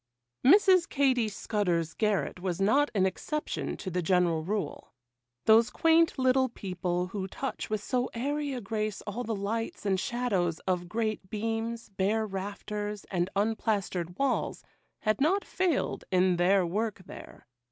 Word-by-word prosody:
Mrs. 370 +3 +6
Katy 260 -6 +2
Scudder's 180 -6 -1
garret 210 -4 0
was 180 -1 -2
not 270 +9 +3
an 190 -2 +3
exception 300 +11 -3
to 185 - -5
the 180 +1 0
general 175 -2 +2
rule. 205 -6 -4 0.5
Those 225 +1 +6
quaint 330 0 +3
little 260 0 +3
people 180 -4 -2
who 190 -1 -4
touch 270 +6 -5
with 215 -1 -2
so 250 +1 0
airy 285 +4 -1
a 250 - -4
grace 215 0 -3
all 215 +4 -4
the 225 -1 -2
lights 215 +3 -3
and 190 -2 +2
shadows 195 -9 0
of 180 -2 -2
great 215 -2 -2
beams, 225 +2 -3
bare 205 +3 0
rafters, 205 +1 -5
and 180 -1 0
unplastered 200 -4 -1
walls, 275 -1 0 0.4
had 215 +3 0
not 380 +7 +2
failed 365 -6 0
in 185 -1 +3
their 185 +1 +4
work 210 +3 -2
there. - - -11
210 Hz, 145 wpm, -29 LUFS, 185-245 Hz, 0.5 s, Mrs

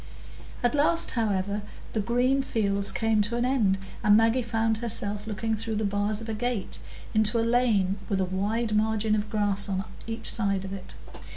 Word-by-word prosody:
At 245 - +2
last, 305 +3 +4
however, 205 -3 -1 0.3
the 220 - 0
green 250 +5 +2
fields 200 -6 0
came 225 -1 +1
to 220 +3 -1
an 240 - +1
end, 225 -7 +2 0.3
and 210 0 +6
Maggie 225 +3 +3
found 225 -1 0
herself 210 -2 -2
looking 225 +1 -2
through 220 0 -2
the 215 0 -1
bars 205 +1 0
of 225 - -8
a 220 - -2
gate 230 -2 -3 0.3
into 215 +1 +4
a 225 - +1
lane 220 -5 +2
with 195 -2 0
a 190 - +2
wide 210 +4 -1
margin 220 0 +1
of 210 0 -1
grass 205 -1 0
on 190 0 -1 0.2
each 225 0 -3
side 200 -4 +1
of 190 - -6
it. 195 -2 -9
215 Hz, 185 wpm, -27 LUFS, 205-230 Hz, 0.3 s, and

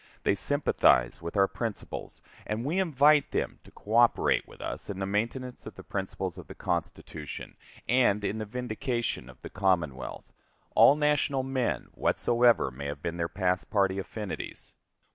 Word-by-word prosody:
They - - +3
sympathize 100 - +2
with 85 +4 -5
our 100 0 +5
principles, 115 -1 -6 0.2
and 110 +3 -2
we 165 +7 0
invite 150 -4 +4
them - - -2
to - - -15
coöperate 115 +3 +2
with - - -15
us - - -5
in 100 - -4
the 95 - -2
maintenance 115 +6 -3
of - - -9
the - - -10
principles 95 -2 -4
of 90 - -11
the - - -10
Constitution 75 -3 -4 0.3
and 120 -4 +3
in 105 +2 -1
the 110 - -3
vindication 120 - -3
of 65 - -14
the - - -6
Commonwealth 85 -9 -1 0.4
all 140 - +7
national 150 -2 +1
men, 130 - -1
whatsoever 120 - +3
may 70 +3 -6
have 70 0 -6
been 85 0 -3
their 85 -1 -1
past 90 -1 0
party 100 -2 +2
affinities. 105 +1 -6
105 Hz, 160 wpm, -29 LUFS, 90-125 Hz, 0.4 s, all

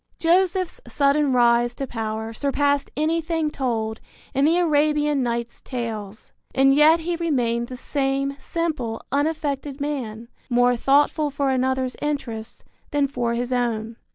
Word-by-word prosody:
Joseph's 365 +1 +1
sudden 280 +3 +2
rise 240 -1 +3
to 275 - -3
power 220 -2 -4
surpassed 285 +2 0
anything 320 0 0
told 225 -6 -2 0.3
in 275 +1 +3
the 330 +3 +4
Arabian 300 -3 +2
Nights' 235 -1 -3
Tales, 220 -5 -6 0.2
and 270 0 +5
yet 310 +3 +6
he 345 +1 -2
remained 240 -8 0
the 255 - -7
same 275 0 -1
simple, 295 -7 -3
unaffected 285 -1 -1
man, 240 -6 -4 0.2
more 245 0 +4
thoughtful 290 +4 +2
for 280 -1 0
another's 260 0 0
interests 240 -7 -4 0.3
than 285 -1 +1
for 240 -3 -1
his 245 +1 -2
own. 230 -2 -1
270 Hz, 130 wpm, -23 LUFS, 235-295 Hz, 0.3 s, yet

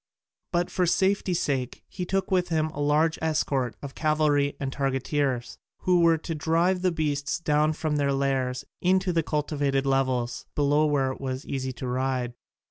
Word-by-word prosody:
But 175 0 0
for 180 -2 +1
safety 190 0 +2
sake 135 -6 -2
he 180 - -5
took 195 0 -1
with 180 -2 +2
him 155 -1 +1
a 145 - -8
large 150 +3 +2
escort 140 -6 0
of 140 -1 -6
cavalry 150 -2 +1
and 135 -1 -3
targeteers, 135 -2 -1 0.2
who 180 -1 +3
were 165 -1 +5
to 165 +1 -5
drive 165 +4 +1
the 185 -1 +2
beasts 145 -3 -1
down 155 -2 +2
from 155 -1 -1
their 140 -1 +1
lairs 135 -2 0 0.2
into 185 0 +2
the 165 - +3
cultivated 145 -3 -1
levels 130 -3 0
below 145 +1 +3
where 135 -3 +1
it 130 - -9
was 130 0 -4
easy 130 -1 -3
to 130 - -6
ride. 125 -1 -1
145 Hz, 170 wpm, -26 LUFS, 135-165 Hz, 0.2 s, were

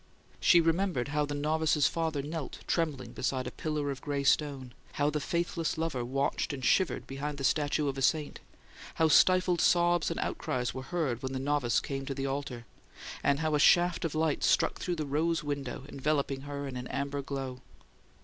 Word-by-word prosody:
She 175 - +6
remembered 165 -5 0
how 150 0 0
the 145 - -3
novice's 150 0 +2
father 160 -4 -1
knelt, 155 -1 -6
trembling, 140 -8 -1
beside 130 0 -2
a 125 - -4
pillar 150 -1 -2
of 135 - -7
gray 145 -2 -2
stone; 140 -3 +1 0.2
how 145 +1 +1
the 150 - -1
faithless 170 +2 -1
lover 160 -6 -1
watched 135 +4 -1
and 130 -2 -4
shivered 190 -2 +2
behind 140 +2 -5
the 140 - -5
statue 145 +1 +1
of 135 -1 -2
a - - -4
saint; 150 +2 +1 0.6
how 160 -1 +3
stifled 180 +2 +5
sobs 175 -1 +3
and - - -3
outcries 125 -1 -2
were 130 - -5
heard 135 -4 -2
when 130 0 -4
the 130 - -2
novice 135 -3 +1
came 135 -1 -5
to 135 - -3
the 135 0 -3
altar; 135 -3 -4 0.6
and 140 +2 +2
how 155 -1 0
a 150 - +3
shaft 175 +3 +4
of 160 -2 -2
light 155 -2 0
struck - - +2
through 180 - -2
the 155 -2 -3
rose 155 +3 0
window, 140 -3 -4
enveloping 140 -1 -1
her 140 0 -5
in 130 -2 -6
an 125 0 -5
amber 140 0 -3
glow. 135 -2 -5
145 Hz, 190 wpm, -30 LUFS, 135-160 Hz, 0.6 s, She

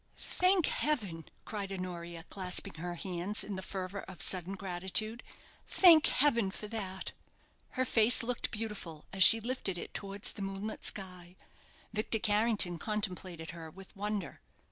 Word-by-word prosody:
"Thank 365 -2 +2
heaven!" 205 - 0 0.2
cried 200 -3 -5
Honoria, 175 -3 -6
clasping 185 -2 +2
her 175 +1 -5
hands 185 +3 0
in 205 - -5
the 190 - -4
fervour 190 +1 -5
of 190 - -11
sudden 185 +1 +2
gratitude; 195 +5 +1 0.5
"thank 330 -4 +7
heaven 235 -8 +4
for 210 +2 -7
that!" 195 -4 -5 0.7
Her 260 - +2
face 235 +1 +4
looked 245 +1 -1
beautiful, 210 -8 -6
as 195 - -3
she 225 - +8
lifted 225 -5 -1
it - - -7
towards 200 0 -2
the - - -9
moonlit 195 +2 -5
sky. 180 -3 -4 0.6
Victor 215 +1 0
Carrington 210 -5 +2
contemplated 185 -5 -3
her 165 -2 -9
with 190 +4 -14
wonder. 205 -2 -4
195 Hz, 145 wpm, -32 LUFS, 180-220 Hz, 0.7 s, she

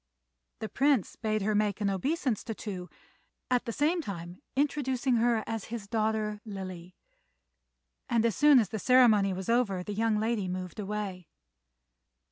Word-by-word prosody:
The 220 - -2
Prince 270 -4 +1
bade 215 -2 -1
her 215 +1 +1
make 210 -1 +1
an 205 - 0
obeisance 255 - -1
to 225 - -4
Tou, 185 -5 -6 0.6
at 250 -1 +2
the 230 - -2
same 315 +8 +1
time 175 - -7
introducing 265 -3 +1
her 230 -1 +2
as 225 -2 -4
his 225 -3 -6
daughter 215 -1 -1
Lily; 185 -4 -7 1.1
and 230 -1 +2
as 230 - +1
soon 295 -2 +6
as 220 -6 +3
the 220 - -4
ceremony 220 -4 +5
was 190 0 -5
over 230 -6 +1
the 205 - -5
young 220 +1 +1
lady 220 -3 0
moved 185 +2 -5
away. 200 -3 -4
215 Hz, 155 wpm, -29 LUFS, 195-240 Hz, 1.1 s, soon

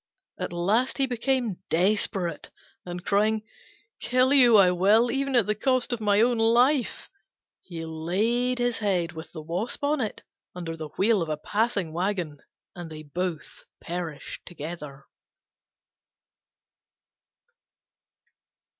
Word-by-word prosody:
At - - -3
last 205 +9 +1
he 275 - +3
became 245 -4 -1
desperate, 180 -2 0 0.4
and 175 +1 -6
crying, 215 +2 +2 0.6
"Kill 255 +2 +2
you 245 -5 +7
I 185 -3 +6
will, 205 +7 +4
even 275 0 -1
at 235 -5 +4
the 210 - +1
cost 255 +3 0
of 235 - -4
my 205 0 +3
own 240 0 +3
life," 245 +4 +2 0.5
he 165 -3 -8
laid 210 +11 0
his 245 -1 0
head 185 -5 0
with 160 -1 -9
the 160 -2 -8
Wasp 180 - -3
on 290 0 +1
it 215 - -4 0.3
under 170 -2 -5
the 155 -2 -7
wheel 210 0 +3
of 165 - -3
a 155 - -1
passing 200 -2 -1
waggon, 175 -4 -2 0.4
and 175 -2 -7
they 155 -1 -9
both 170 +1 -5 0.2
perished 170 -4 -6
together. 150 -4 -8
200 Hz, 130 wpm, -26 LUFS, 170-240 Hz, 0.6 s, you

